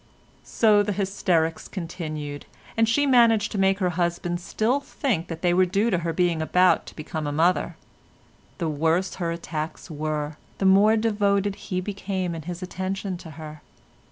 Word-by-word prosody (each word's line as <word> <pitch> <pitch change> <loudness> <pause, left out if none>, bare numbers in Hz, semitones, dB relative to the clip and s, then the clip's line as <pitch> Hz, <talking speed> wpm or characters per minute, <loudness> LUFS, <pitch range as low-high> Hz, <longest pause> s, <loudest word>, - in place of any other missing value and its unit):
So 210 -2 +4
the 205 0 -1
hysterics 180 -5 0
continued, 155 -5 -6 0.3
and 225 0 +3
she 285 +5 +3
managed 230 -5 +4
to 205 - -2
make 195 0 +3
her 185 -3 0
husband 175 0 -1
still 230 +9 0
think 235 - -2
that 165 0 -7
they 175 -1 +3
were 185 +1 +4
due 205 +5 +1
to 180 - +2
her 170 0 -2
being 170 -1 +1
about 180 +3 +3
to - - -11
become 155 0 -4
a - - -1
mother. 165 +5 +1 0.8
The 170 - -2
worse 160 +5 +1
her 170 - 0
attacks 165 0 -5
were, 150 0 -3 0.2
the 195 - -1
more 200 +3 +6
devoted 205 -2 +1 0.2
he 185 -1 0
became 190 -2 -3
in 165 - -5
his 175 +3 -6
attention 190 +1 -3
to 170 - -11
her. 155 -1 -9
180 Hz, 170 wpm, -25 LUFS, 165-200 Hz, 0.8 s, more